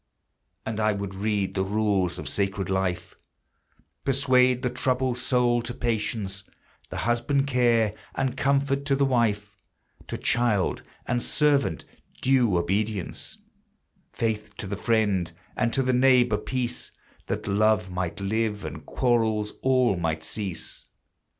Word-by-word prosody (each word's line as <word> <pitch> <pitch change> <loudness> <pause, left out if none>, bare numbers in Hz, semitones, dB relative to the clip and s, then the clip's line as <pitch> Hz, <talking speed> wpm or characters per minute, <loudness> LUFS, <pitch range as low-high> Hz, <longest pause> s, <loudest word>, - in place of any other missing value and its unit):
And 110 -1 -3
I 110 0 +2
would 100 -1 -4
read 100 0 -1
the 95 - 0
rules 100 -3 +1
of 75 - -6
sacred 95 +3 -1
life; 95 -2 -1 0.9
Persuade 130 -2 +3
the 125 - 0
troubled 130 0 0
soul 125 -1 +2
to 120 +1 -5
patience; 105 -5 -1 0.5
The - - -6
husband 120 +4 +1
care, 120 -5 +2 0.2
and 135 -1 -1
comfort 140 0 +1
to 140 -1 +2
the 140 0 +2
wife, 105 -6 0 0.5
To - - -4
child 115 -6 +1 0.2
and 120 0 0
servant 140 - +2 0.3
due 125 -8 +3
obedience; 100 - -2 0.7
Faith 110 -2 -3
to - - -5
the 100 +1 -3
friend, 100 -6 +1 0.2
and 115 - +1
to 135 +3 +2
the 130 0 +1
neighbor 125 -3 +4
peace, 120 +3 -3 0.3
That - - -3
love 100 -2 +2
might 90 +1 -3
live, 105 +1 -1
and - - -7
quarrels 110 -4 +1
all 130 -6 +3
might 80 -2 -2
cease. 95 +1 -5
110 Hz, 130 wpm, -26 LUFS, 100-125 Hz, 0.9 s, neighbor